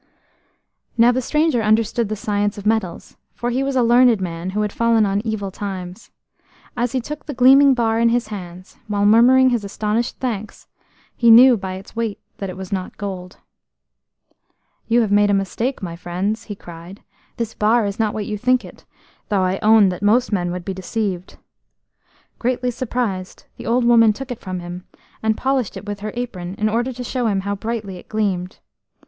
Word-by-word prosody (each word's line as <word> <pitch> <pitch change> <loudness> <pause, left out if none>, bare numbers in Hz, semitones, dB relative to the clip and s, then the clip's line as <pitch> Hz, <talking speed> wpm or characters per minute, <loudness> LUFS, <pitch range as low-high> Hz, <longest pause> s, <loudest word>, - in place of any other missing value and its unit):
Now 235 +1 +6
the 255 +1 -1
stranger 300 -2 +1
understood 220 +1 +1
the 215 - -2
science 205 0 -1
of 205 - -8
metals, 215 -5 -2 0.2
for 240 0 -2
he 255 +2 0
was 270 0 -1
a 255 - +3
learned 240 -1 +5
man 175 -1 -4
who 210 +3 -1
had 210 -1 -1
fallen 230 -2 +3
on 200 0 0
evil 215 -4 -3
times. 185 0 -7 0.7
As 245 0 -1
he 260 - +1
took 295 +6 -7
the 290 - -5
gleaming 270 +2 +6
bar 225 -2 +1
in 235 0 +4
his 235 -1 0
hands, 185 -3 -9
while 205 -1 0
murmuring 250 +4 +6
his 235 -3 0
astonished 210 +3 -2
thanks, 220 -5 -5 0.5
he 235 - +3
knew 245 +2 +9
by 190 -3 -5
its 190 +3 -10
weight 225 -3 -2 0.2
that 195 - -5
it 185 - -7
was 190 -1 -8
not 185 -2 -4
gold. 185 -3 -6 1.5
"You 240 +1 +3
have 215 -3 -1
made 205 0 +4
a 200 - +3
mistake, 200 +6 -2
my 170 -2 -5
friends," 185 +6 -3
he 205 - -6
cried. 175 +1 -12 0.3
"This 230 -2 -3
bar 220 +1 +2
is 200 +2 -4
not 220 -2 0
what 215 -1 -3
you 210 -1 -4
think 255 +2 +2
it, - - -14 0.4
though 200 -3 +1
I 185 +1 0
own 215 -2 +6
that 180 0 -5
most 225 +5 +2
men 175 -4 0
would 180 -1 -6
be 195 - -3
deceived." 190 -1 -4 1.0
Greatly 250 0 0
surprised, 225 -6 -4
the - - -8
old 240 +1 +2
woman 230 -2 +5
took 270 +4 -8
it 245 - -5
from 185 -1 -5
him, 175 +1 -8 0.3
and 220 0 +1
polished 265 -4 -1
it - - -9
with 205 -1 -5
her 210 +1 -4
apron 190 -7 -5
in 215 - +1
order 240 +4 0
to 250 0 -7
show 245 -1 -2
him 195 -3 0
how 200 +1 -2
brightly 210 -2 -4
it - - -15
gleamed. 190 -4 -2
215 Hz, 195 wpm, -20 LUFS, 195-240 Hz, 1.5 s, knew